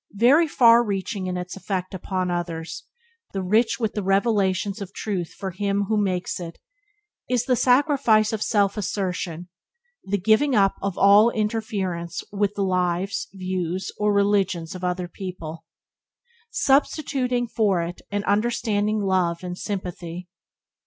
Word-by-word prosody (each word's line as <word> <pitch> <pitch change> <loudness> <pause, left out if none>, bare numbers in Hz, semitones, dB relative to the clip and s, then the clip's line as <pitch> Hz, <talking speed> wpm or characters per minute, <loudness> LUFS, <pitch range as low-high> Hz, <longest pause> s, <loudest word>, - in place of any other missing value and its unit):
Very 280 +10 +5
far 235 -4 +6
reaching 195 -2 -3
in 180 0 -2
its 180 0 -5
effect 190 -1 -4
upon 185 0 -2
others, 170 -2 -4 0.5
and 185 -1 -3
rich 225 +2 +3
with 220 -3 -1
the 210 - -2
revelations 195 0 +1
of 195 0 -7
Truth 185 -6 -4
for 190 -1 -4
him 200 +2 -1
who 220 - +2
makes 185 -2 -2
it, 170 -2 -7 0.7
is 245 -1 +1
the 255 - +2
sacrifice 250 -4 +3
of 215 - -2
self 205 -2 +1
assertion 180 -4 -3 0.3
— 480 0 -46
the 205 +1 -1
giving 220 +8 +3
up 195 -2 +4
of 195 -2 -3
all 205 +3 +6
interference 200 -6 -2
with 205 0 0
the 200 - 0
lives, 185 +1 0
views, 185 -1 -3
or 210 0 +1
religion 200 -4 +2
of 185 -1 -8
other 180 0 -1
people, 165 -3 -7 0.8
substituting 270 - +1
for 205 -6 +1
it 170 +1 -6
an 205 0 -2
understanding 215 0 0
love 185 -3 0
and 180 -1 -4
sympathy. 180 -3 -5
200 Hz, 145 wpm, -24 LUFS, 180-215 Hz, 0.8 s, far